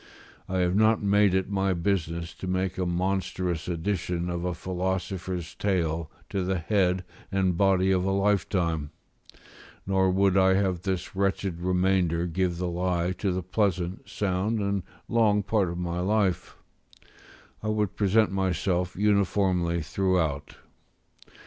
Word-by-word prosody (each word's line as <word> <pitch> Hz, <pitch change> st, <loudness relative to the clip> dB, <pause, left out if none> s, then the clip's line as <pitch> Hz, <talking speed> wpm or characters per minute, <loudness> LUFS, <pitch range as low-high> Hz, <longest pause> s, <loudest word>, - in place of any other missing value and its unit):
I 95 Hz, -, -1 dB
have 90 Hz, +1 st, +1 dB
not 110 Hz, +1 st, +3 dB
made 100 Hz, -1 st, +4 dB
it 95 Hz, +1 st, 0 dB
my 95 Hz, -1 st, +1 dB
business 85 Hz, -2 st, -1 dB
to 95 Hz, -, -7 dB
make 95 Hz, 0 st, -1 dB
a 90 Hz, -, 0 dB
monstrous 90 Hz, -1 st, -1 dB
addition 90 Hz, 0 st, -2 dB
of 85 Hz, 0 st, -3 dB
a 90 Hz, -1 st, -1 dB
philosopher's 90 Hz, -1 st, -3 dB
tail 85 Hz, -5 st, -1 dB, 0.2 s
to 95 Hz, -, -1 dB
the 95 Hz, +1 st, 0 dB
head 90 Hz, 0 st, +1 dB, 0.3 s
and 95 Hz, -2 st, +1 dB
body 95 Hz, 0 st, +3 dB
of 90 Hz, -1 st, +2 dB
a 95 Hz, -, 0 dB
libertine; 90 Hz, -6 st, 0 dB, 1.0 s
nor 95 Hz, -1 st, +2 dB
would 95 Hz, +1 st, +3 dB
I 95 Hz, 0 st, +5 dB
have 95 Hz, -3 st, 0 dB
this 95 Hz, -1 st, -3 dB
wretched 95 Hz, -2 st, -1 dB
remainder 90 Hz, -2 st, +1 dB
give 90 Hz, 0 st, -1 dB
the 90 Hz, +1 st, -2 dB
lie 90 Hz, 0 st, 0 dB
to 100 Hz, -, 0 dB
the 90 Hz, 0 st, -2 dB
pleasant, 90 Hz, -1 st, -1 dB
sound, 100 Hz, +3 st, -1 dB
and 100 Hz, -1 st, 0 dB, 0.3 s
long 105 Hz, -3 st, +3 dB
part 100 Hz, -3 st, +1 dB
of 85 Hz, -, -5 dB
my 90 Hz, 0 st, -2 dB
life: 100 Hz, -1 st, 0 dB, 1.1 s
I 110 Hz, -, -4 dB
would 105 Hz, -2 st, 0 dB
present 105 Hz, +1 st, +3 dB
myself 90 Hz, -1 st, 0 dB
uniformly 95 Hz, -4 st, +1 dB
throughout. 80 Hz, -5 st, -1 dB
95 Hz, 140 wpm, -27 LUFS, 90-100 Hz, 1.1 s, I